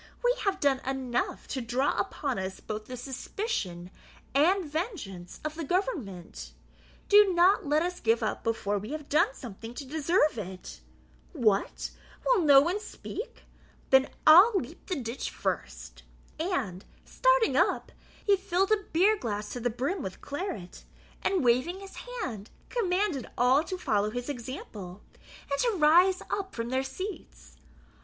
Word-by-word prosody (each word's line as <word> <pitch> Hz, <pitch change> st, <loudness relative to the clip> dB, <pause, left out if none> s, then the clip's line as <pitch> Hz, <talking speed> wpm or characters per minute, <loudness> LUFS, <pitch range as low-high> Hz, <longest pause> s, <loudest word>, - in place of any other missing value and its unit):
We -, -, +4 dB
have 385 Hz, -1 st, +1 dB
done 280 Hz, -4 st, +3 dB
enough 260 Hz, -2 st, -2 dB
to 260 Hz, -, -2 dB
draw 245 Hz, +4 st, 0 dB
upon 270 Hz, -7 st, -2 dB
us 190 Hz, 0 st, -4 dB
both 215 Hz, 0 st, -6 dB
the 250 Hz, +2 st, -7 dB
suspicion 245 Hz, -, -4 dB, 0.4 s
and 350 Hz, +7 st, +3 dB
vengeance 295 Hz, -, -5 dB
of 305 Hz, -, -2 dB
the 325 Hz, +1 st, -5 dB
government; 195 Hz, -, -3 dB, 0.5 s
do 410 Hz, -1 st, +7 dB
not 355 Hz, -1 st, +4 dB
let 300 Hz, +3 st, +3 dB
us 360 Hz, 0 st, -3 dB
give 225 Hz, 0 st, +2 dB
up 215 Hz, -, -2 dB
before 205 Hz, -3 st, 0 dB
we 215 Hz, +8 st, -6 dB
have 300 Hz, -2 st, -6 dB
done 285 Hz, -2 st, +3 dB
something 230 Hz, 0 st, -9 dB
to 280 Hz, -, -6 dB
deserve 305 Hz, -, +1 dB
it. 185 Hz, -2 st, -8 dB, 0.5 s
What, 215 Hz, -, +1 dB, 0.3 s
will -, -, +4 dB
no 285 Hz, -4 st, +8 dB
one 350 Hz, +7 st, 0 dB
speak? 450 Hz, +2 st, -8 dB, 0.5 s
Then 265 Hz, +1 st, +6 dB, 0.2 s
I'll 370 Hz, +9 st, +9 dB
leap -, -, -10 dB
the 370 Hz, -, -1 dB
ditch 235 Hz, 0 st, -4 dB
the -, -, -17 dB
first." -, -, -4 dB, 0.4 s
And, 260 Hz, -, -2 dB, 0.2 s
starting -, -, +3 dB
up, -, -, +2 dB, 0.3 s
he 405 Hz, -, +5 dB
filled 380 Hz, +2 st, 0 dB
a 415 Hz, -3 st, +2 dB
beer 390 Hz, +7 st, +4 dB
glass 210 Hz, -, -4 dB
to 245 Hz, -, -4 dB
the 245 Hz, +1 st, 0 dB
brim 275 Hz, -, -2 dB
with 190 Hz, -5 st, -6 dB
claret, 285 Hz, -, -6 dB, 0.4 s
and 380 Hz, -6 st, +1 dB
waving 255 Hz, +10 st, +2 dB
his 390 Hz, -1 st, -11 dB, 0.3 s
hand, 215 Hz, -4 st, -5 dB, 0.2 s
commanded 375 Hz, -, 0 dB
all 255 Hz, +5 st, +4 dB
to 370 Hz, -, -4 dB
follow 210 Hz, -, +1 dB
his 245 Hz, +4 st, -5 dB
example, 220 Hz, -8 st, -7 dB, 0.5 s
and 280 Hz, -, 0 dB
to 465 Hz, -5 st, +1 dB
rise 350 Hz, +4 st, +5 dB
up 390 Hz, -1 st, -3 dB
from 230 Hz, 0 st, -3 dB
their 260 Hz, +1 st, +1 dB
seats. 265 Hz, -, -8 dB
280 Hz, 155 wpm, -29 LUFS, 225-370 Hz, 0.5 s, I'll